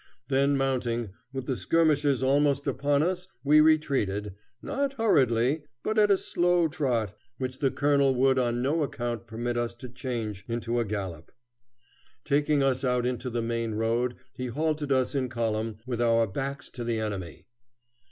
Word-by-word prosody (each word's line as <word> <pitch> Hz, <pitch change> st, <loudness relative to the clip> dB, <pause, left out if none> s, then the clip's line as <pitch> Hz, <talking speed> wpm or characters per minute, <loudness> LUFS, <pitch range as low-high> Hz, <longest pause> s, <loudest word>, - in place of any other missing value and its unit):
Then 140 Hz, +1 st, +3 dB
mounting, 120 Hz, -5 st, -1 dB, 0.2 s
with 130 Hz, -1 st, -5 dB
the 130 Hz, -, -1 dB
skirmishers 145 Hz, -, +2 dB
almost 140 Hz, +1 st, +2 dB
upon 140 Hz, +1 st, +1 dB
us, 180 Hz, +1 st, -1 dB, 0.2 s
we 150 Hz, +2 st, +6 dB
retreated, 130 Hz, -11 st, +2 dB, 0.3 s
not 280 Hz, -, -2 dB
hurriedly, 140 Hz, -, +2 dB, 0.2 s
but 215 Hz, 0 st, +1 dB
at 210 Hz, -1 st, +5 dB
a 200 Hz, -, +5 dB
slow 175 Hz, -2 st, +2 dB
trot, 125 Hz, -, -1 dB, 0.2 s
which 130 Hz, 0 st, -4 dB
the 135 Hz, -, +2 dB
colonel 140 Hz, -1 st, +2 dB
would 130 Hz, +1 st, +3 dB
on 120 Hz, -1 st, 0 dB
no 155 Hz, +5 st, +1 dB
account 120 Hz, -4 st, -3 dB
permit 120 Hz, +2 st, -3 dB
us 120 Hz, 0 st, -2 dB
to 125 Hz, +2 st, -9 dB
change 120 Hz, -5 st, -4 dB
into 120 Hz, 0 st, -1 dB
a 120 Hz, -, 0 dB
gallop. 95 Hz, -6 st, -5 dB, 0.9 s
Taking 145 Hz, 0 st, +2 dB
us 130 Hz, -1 st, +1 dB
out 125 Hz, -1 st, +1 dB
into 125 Hz, 0 st, -2 dB
the 120 Hz, -1 st, -2 dB
main 115 Hz, -1 st, -2 dB
road 115 Hz, +3 st, 0 dB, 0.2 s
he 125 Hz, -, -4 dB
halted 150 Hz, +3 st, -1 dB
us 130 Hz, 0 st, +2 dB
in 130 Hz, -3 st, -1 dB
column, 115 Hz, -2 st, -2 dB
with 120 Hz, -2 st, -2 dB
our 115 Hz, -1 st, +4 dB
backs 140 Hz, +7 st, -5 dB
to 120 Hz, -, -6 dB
the 115 Hz, -1 st, -1 dB
enemy. 100 Hz, -6 st, -5 dB
130 Hz, 160 wpm, -27 LUFS, 115-145 Hz, 0.9 s, we